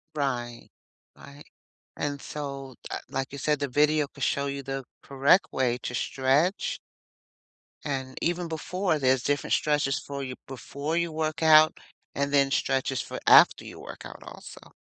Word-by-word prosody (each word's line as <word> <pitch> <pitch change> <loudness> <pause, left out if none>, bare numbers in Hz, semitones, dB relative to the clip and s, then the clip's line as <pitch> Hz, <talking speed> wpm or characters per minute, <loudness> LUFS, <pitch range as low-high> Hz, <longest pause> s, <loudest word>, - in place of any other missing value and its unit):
Right. 120 -5 -3 0.5
Right. 140 +1 -13 0.5
And 145 -1 -3
so, 140 -3 -6 0.2
uh, - - -3
like 135 0 -2
you 140 - -7
said, 150 +1 0
the 140 - -1
video 150 +2 +3
could - - -8
show 140 0 +1
you 140 0 -4
the 135 0 -4 0.2
correct 140 +7 +3
way 125 -2 +1
to - - -4
stretch 140 - +1 1.0
and 130 -2 -4
even 175 +1 -1
before, 165 +1 -1
there's 130 -2 +2
different 145 -1 +1
stretches 145 -2 +1
for 140 -1 -6
you 130 -1 -5
before 140 +4 -5
you 170 -1 0
work 155 0 -2
out 155 -1 +6 0.3
and 140 0 -1
then 140 -1 +3
stretches 135 -1 0
for - - -7
after - - +7
you - - -10
work - - -10
out - - -10
also. - - -12
140 Hz, 160 wpm, -27 LUFS, 135-155 Hz, 1.0 s, after